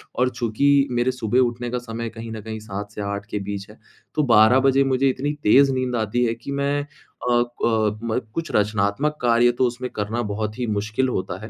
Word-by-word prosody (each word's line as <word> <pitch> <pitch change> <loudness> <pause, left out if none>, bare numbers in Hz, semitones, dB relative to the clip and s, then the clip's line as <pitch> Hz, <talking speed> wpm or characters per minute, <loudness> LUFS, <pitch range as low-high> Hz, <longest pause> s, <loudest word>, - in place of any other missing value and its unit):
और 125 +1 +2
चूँकि 140 +5 +2
मेरे 120 +1 +1
सुबह 125 -1 0
उठने 120 -1 0
का 125 - -1
समय 115 0 -4
कहीं 115 0 -8
न 110 -1 -6
कहीं 110 +1 -6
7 105 -1 -7
से 105 - -6
8 100 0 -4
के 105 - -1
बीच 100 0 -5
है। 105 - -15 0.4
तो 150 - +2
12 110 +4 +6
बजे 135 +1 +4
मुझे 135 0 +2
इतनी 140 +3 -2
तेज़ 135 +6 +6
नींद 130 -1 -1
आती 115 +2 0
है 115 - 0
कि 115 +4 -8
मैं 140 +1 0 0.5
अ - - +3
अ, 115 -3 +1
म 115 +1 0
कुछ 165 0 -4
रचनात्मक 105 +8 +1
कार्य 120 0 +4
तो 130 - +4
उसमें 125 +1 -5
करना 105 +3 -2
बहुत 105 +1 -3
ही 125 - 0
मुश्किल 110 +5 0
होता 95 -5 -3
है। 110 - -9
120 Hz, 215 wpm, -22 LUFS, 105-130 Hz, 0.5 s, 12